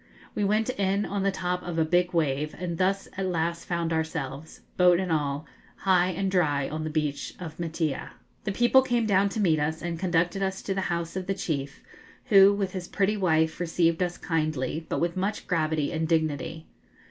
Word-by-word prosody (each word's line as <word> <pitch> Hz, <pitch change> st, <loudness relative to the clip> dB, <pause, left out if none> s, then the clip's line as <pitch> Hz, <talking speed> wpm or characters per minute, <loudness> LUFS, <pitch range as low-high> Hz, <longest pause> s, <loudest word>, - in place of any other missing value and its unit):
We 210 Hz, -, -1 dB
went 215 Hz, +4 st, +2 dB
in 195 Hz, +1 st, +1 dB
on 200 Hz, 0 st, -2 dB
the 195 Hz, -, +2 dB
top 180 Hz, -2 st, -2 dB
of 175 Hz, -2 st, -5 dB
a 160 Hz, -, +3 dB
big 175 Hz, +2 st, +2 dB
wave, 150 Hz, -2 st, 0 dB
and 170 Hz, -1 st, -4 dB
thus 195 Hz, +1 st, +1 dB
at 195 Hz, -1 st, -1 dB
last 170 Hz, -1 st, -1 dB
found 170 Hz, -1 st, -1 dB
ourselves 160 Hz, -2 st, -4 dB
boat 180 Hz, -1 st, +5 dB
and 185 Hz, -2 st, -2 dB
all 145 Hz, -1 st, -1 dB, 0.3 s
high 180 Hz, -2 st, +3 dB
and 190 Hz, +1 st, -1 dB
dry 145 Hz, -7 st, +2 dB
on 155 Hz, +1 st, -4 dB
the 155 Hz, -, -3 dB
beach 150 Hz, -2 st, -2 dB
of 165 Hz, -3 st, -8 dB
Maitea. 160 Hz, -3 st, -2 dB, 0.3 s
The 205 Hz, -, -1 dB
people 240 Hz, +5 st, +5 dB
came 240 Hz, -3 st, 0 dB
down 200 Hz, -1 st, +3 dB
to 220 Hz, -, -4 dB
meet 165 Hz, -7 st, +3 dB
us, 155 Hz, +2 st, -1 dB
and 170 Hz, -1 st, -4 dB
conducted 175 Hz, +1 st, +1 dB
us 190 Hz, 0 st, -2 dB
to 195 Hz, -, -1 dB
the 195 Hz, -, -1 dB
house 170 Hz, -1 st, -2 dB
of 190 Hz, 0 st, -4 dB
the 195 Hz, -, 0 dB
chief, 140 Hz, -7 st, -4 dB, 0.5 s
who, 195 Hz, -1 st, +8 dB
with 200 Hz, -2 st, -1 dB
his 180 Hz, -2 st, -5 dB
pretty 200 Hz, +2 st, +1 dB
wife, 160 Hz, -5 st, +1 dB
received 170 Hz, 0 st, +1 dB
us 175 Hz, -1 st, -1 dB
kindly, 155 Hz, -1 st, -2 dB
but -, -, -1 dB
with 170 Hz, 0 st, 0 dB
much 195 Hz, +3 st, -2 dB
gravity 155 Hz, -4 st, 0 dB
and 160 Hz, 0 st, -1 dB
dignity. 160 Hz, -1 st, -1 dB
170 Hz, 200 wpm, -27 LUFS, 160-190 Hz, 0.5 s, who